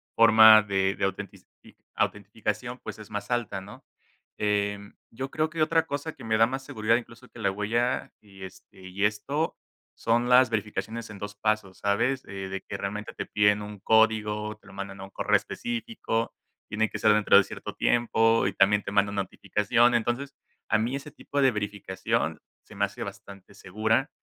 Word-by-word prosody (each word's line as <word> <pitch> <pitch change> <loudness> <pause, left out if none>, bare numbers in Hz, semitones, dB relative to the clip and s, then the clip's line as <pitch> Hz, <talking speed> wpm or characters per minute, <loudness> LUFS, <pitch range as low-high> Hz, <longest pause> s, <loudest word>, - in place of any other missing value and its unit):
forma 110 -1 +8
de 95 -1 0
de - - -5
autentici 100 0 -5 0.5
autenticación 105 +4 -2
pues 110 0 -7
es 105 0 -12
más 105 0 -5
alta, 120 -5 -1
¿no? 105 +7 -13 0.5
Eh, 100 -1 0 0.3
yo 135 +4 -5
creo 155 +2 -1
que 160 0 -4
otra 165 +1 +3
cosa 145 +3 -4
que - - -14
me 110 -1 +1
da 115 +1 +5
más 130 +1 -4
seguridad 110 0 +1
incluso 120 +1 -6
que - - -14
la 100 -3 +1
huella, 115 +5 -1
y 95 -2 -14
este 95 - -15
y 100 +2 -1
esto 140 +10 -1 0.4
son 120 +1 0
las 125 -1 +6
verificaciones 110 +1 -3
en 100 - -10
2 105 +1 -6
pasos, 105 -3 -1
¿sabes? 115 +6 0
De 95 0 -6
que 100 - -4
realmente 105 +2 -5
te - - -5
piden 105 0 +3
un 105 0 -8
código, 105 -1 +2
te - - -29
lo - - -13
mandan 100 0 -7
a - - -6
un 95 - -9
correo 105 +2 +1
específico, 225 - -2 0.4
tiene 110 +1 0
que - - -5
ser 110 - +4
dentro 105 -1 +5
de 100 - +6
cierto - - -8
tiempo 115 -2 +2
y 100 - -2
también 100 +2 +3
te - - -5
manda 100 0 +2
notificación. 105 +4 +1
Entonces, 120 +4 -1 0.4
a 110 - +4
mí 120 +5 -1
ese 140 +1 -7
tipo 145 - -5
de 135 -1 +5
verificación 105 -3 -2 0.2
se - - -16
me 100 0 +1
hace 100 - -7
bastante 100 0 -11
segura. 110 - 0
105 Hz, 185 wpm, -27 LUFS, 100-120 Hz, 0.5 s, forma